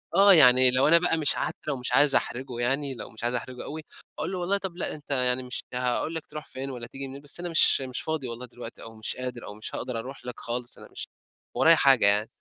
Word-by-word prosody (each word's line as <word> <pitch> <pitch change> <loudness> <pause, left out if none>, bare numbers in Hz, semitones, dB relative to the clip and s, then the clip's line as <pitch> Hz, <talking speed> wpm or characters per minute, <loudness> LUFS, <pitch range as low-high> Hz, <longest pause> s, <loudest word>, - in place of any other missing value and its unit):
آه، 200 0 +7
يعني 130 -5 +7
لو 130 +3 +3
أنا 170 - +7
بقى 175 -2 +1
مش 150 -3 +1
عارف - - -2
لو 140 -3 -1
مش 125 - -5
عايز 145 0 +5
احْرِجه 125 -1 -1
يعني، 135 +2 -1
لو - - -8
مش 110 +1 -12
عايزة 120 +1 +1
احْرِجه 125 +1 -7
أوي، 155 +1 -6 0.4
أقول 165 - -3
له 185 - -3
والله 185 +3 0
طب 190 -3 -6
لأ، - - -2
أنت 150 -1 -12
يعني 125 -1 +1
مش 125 0 -6
هاقول 125 +6 -1
لك 160 - -4
تروْح 150 0 -8
فين 135 +1 -6
والَّا 120 -3 -7
تيجي 135 +1 -7
منين، 135 +1 -9
بس 145 +3 -1
أنا 175 0 -2
مش 160 -4 +4
مش 130 -1 -4
فاضي 155 -4 -3
والله 120 +1 -7
دلوقتي 120 0 -11
أو 115 0 -11
مش 110 - -5
قادر 125 -1 -6
أو 105 - -5
مش 110 - -7
هاقدر 125 -2 -4
أروْح 130 +3 -9
لك 125 - -7
خالص، 120 0 -3
أنا - - -12
مش - - -7 0.5
ورايا 165 +1 +6
حاجة 135 -7 +5
يعني. 105 +2 +4
130 Hz, 255 wpm, -26 LUFS, 125-150 Hz, 0.5 s, آه